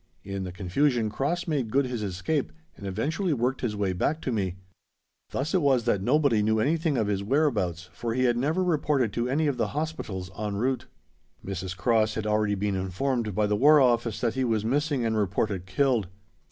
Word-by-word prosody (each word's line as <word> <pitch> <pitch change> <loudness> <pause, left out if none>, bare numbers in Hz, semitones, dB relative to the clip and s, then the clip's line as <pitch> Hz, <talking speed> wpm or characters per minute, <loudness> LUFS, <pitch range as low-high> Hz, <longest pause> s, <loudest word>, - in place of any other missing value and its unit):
In 100 -1 -4
the 90 - -5
confusion 110 +5 0
Cross 170 +10 -1
made 140 -8 -1
good 135 +4 +2
his 125 -3 -3
escape 100 - -2 0.2
and 100 - -8
eventually 155 - -1
worked 125 +1 -1
his 110 -4 -1
way 100 -2 0
back 150 - 0
to 130 - -2
me. 95 -6 -1 0.7
Thus 145 +4 -2
it 185 - +3
was 135 -5 +3
that 105 -5 +1
nobody 130 -1 +3
knew 110 +1 +2
anything 155 +3 +1
of 110 - +1
his 100 -1 -1
whereabouts, 100 - 0
for 115 -1 -3
he 130 - +1
had 120 -2 +3
never 155 +9 +1
reported 145 - +1
to 120 +1 -1
any 150 +4 +1
of 140 -4 0
the - - -2
Hospitals 110 - -4
en 105 -1 -3
route. 125 +5 -1 0.6
Mrs. 95 -1 -4
Cross 110 +1 +2
had 110 - -3
already 105 -1 +1
been 100 +1 -1
informed 105 +4 -1
by 105 0 +2
the 105 0 +1
War 150 +7 +6
Office 120 -4 +2
that 115 -2 +1
he 130 - -1
was 110 -3 0
missing 140 0 0
and 110 -1 0
reported 100 -2 -1
killed. 120 0 +1
115 Hz, 200 wpm, -27 LUFS, 100-140 Hz, 0.7 s, War